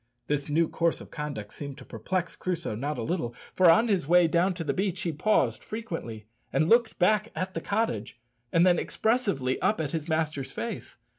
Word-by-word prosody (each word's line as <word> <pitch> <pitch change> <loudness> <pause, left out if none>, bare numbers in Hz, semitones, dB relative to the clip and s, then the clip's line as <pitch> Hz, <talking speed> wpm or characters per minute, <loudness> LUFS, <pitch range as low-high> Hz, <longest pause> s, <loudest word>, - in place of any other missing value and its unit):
This 145 +1 -1
new 160 +2 +3
course 170 -1 0
of - - -12
conduct 145 -9 -5
seemed 140 -2 -7
to - - -12
perplex 175 - -3
Crusoe 170 -8 -3
not 140 +7 -3
a 120 - -3
little, 120 -5 -2 0.2
for 185 -2 +6
on 220 +8 +5
his 190 -9 +1
way 175 +1 +6
down 175 +3 +2
to 170 - -4
the 145 -3 -1
beach 190 0 -1
he 170 - 0
paused 210 +8 +1
frequently 165 - -6 0.3
and 155 - +2
looked 230 +3 +4
back 210 +4 +2
at 185 0 -3
the - - -3
cottage, 130 - -2 0.3
and 165 +1 +5
then 175 -2 +4
expressively 200 - 0
up 215 - +2
at 150 -3 -2
his 160 0 -3
master's 155 -4 -1
face. - - -6
165 Hz, 200 wpm, -28 LUFS, 145-190 Hz, 0.3 s, for